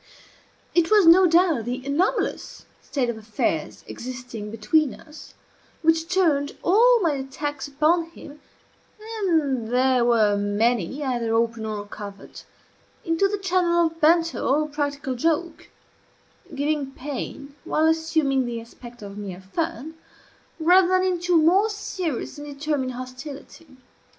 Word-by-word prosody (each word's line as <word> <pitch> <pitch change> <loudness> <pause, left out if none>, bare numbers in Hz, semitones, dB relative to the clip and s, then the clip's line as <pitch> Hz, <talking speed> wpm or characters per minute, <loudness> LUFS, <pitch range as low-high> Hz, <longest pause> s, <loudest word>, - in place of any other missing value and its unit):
It 345 -2 +3
was 420 -4 +5
no 360 +3 +7
doubt 335 - +3
the 250 +2 -4
anomalous 295 +7 -1 0.2
state 265 -4 -2
of 235 -2 -4
affairs 210 -7 -3
existing 245 -4 -7
between 250 +7 +1
us 305 0 -14 0.5
which 325 +1 +2
turned 315 -6 +1
all 470 +7 +5
my 330 - +3
attacks 280 +1 -4
upon 310 +4 +2
him 300 -3 -13 0.8
(and 295 - 0
they 255 +1 +2
were 225 -4 +3
many, 220 - 0
either 240 -4 -1
open 230 -1 0
or 210 -1 -4
covert) 200 -1 -10 0.6
into 330 +3 +2
the 410 +1 -2
channel 355 -3 +2
of 330 0 -5
banter 330 +1 +3
or 300 +3 +1
practical 285 -2 -3
joke 330 +6 -2 0.9
(giving 285 -1 -1
pain 280 +1 -6
while 310 - +1
assuming 315 -5 +1
the 235 -1 -4
aspect 240 0 -13
of 200 0 -8
mere 190 -3 -7
fun) 320 -3 -3 0.7
rather 355 +3 +5
than 370 0 +2
into 355 -1 0
a - - +7
more 365 +7 +4
serious 365 - -4
and 295 - -8
determined 285 -2 -2
hostility. 270 +3 -10
290 Hz, 130 wpm, -24 LUFS, 245-330 Hz, 0.9 s, no